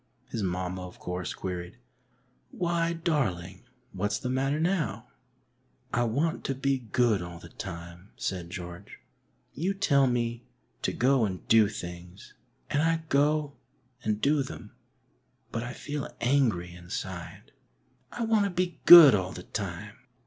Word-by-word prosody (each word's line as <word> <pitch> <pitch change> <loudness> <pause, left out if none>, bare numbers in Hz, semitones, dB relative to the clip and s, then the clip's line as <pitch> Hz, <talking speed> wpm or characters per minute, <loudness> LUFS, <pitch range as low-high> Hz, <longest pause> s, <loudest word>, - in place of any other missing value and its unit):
His 115 - -2
mamma, 90 -1 -3
of 90 - -14
course, 90 -2 -4
queried, 90 -1 -5 0.4
" - - -40 0.2
Why, 170 -1 0
darling, 105 - -2 0.3
what's 100 +2 -1
the 125 - -3
matter 135 +3 0
now? 160 - -1 0.4
" 125 +1 -37
''I 120 -2 +2
want 155 +8 -1
to 135 - -1
be 135 0 0
good 120 -6 +3
all 85 0 -7
the 85 0 -12
time," 85 +1 -8
said 90 -3 -4
George. 90 +1 -8 0.6
You 185 +8 -1
tell 140 -9 +3
me 120 -1 -1 0.4
to - - 0
go 130 0 +3
and 95 -3 -5
do 110 -2 +6
things, 90 -2 -9 0.4
and 145 - +2
I 165 0 +1
go 145 +1 +2 0.5
and 105 -1 0
do 145 +4 +2
them, 120 -5 -8 0.8
but 115 - -2
I 120 +1 -5
feel 145 0 -5
angry 115 -10 +1
inside. 90 0 -7 0.6
I 240 - -3
want 220 -2 +3
to - - 0
be 180 -1 -2
good 170 -7 +12
all 95 -2 0
the 90 - -8
time." 100 +1 -5
115 Hz, 150 wpm, -28 LUFS, 90-145 Hz, 0.8 s, good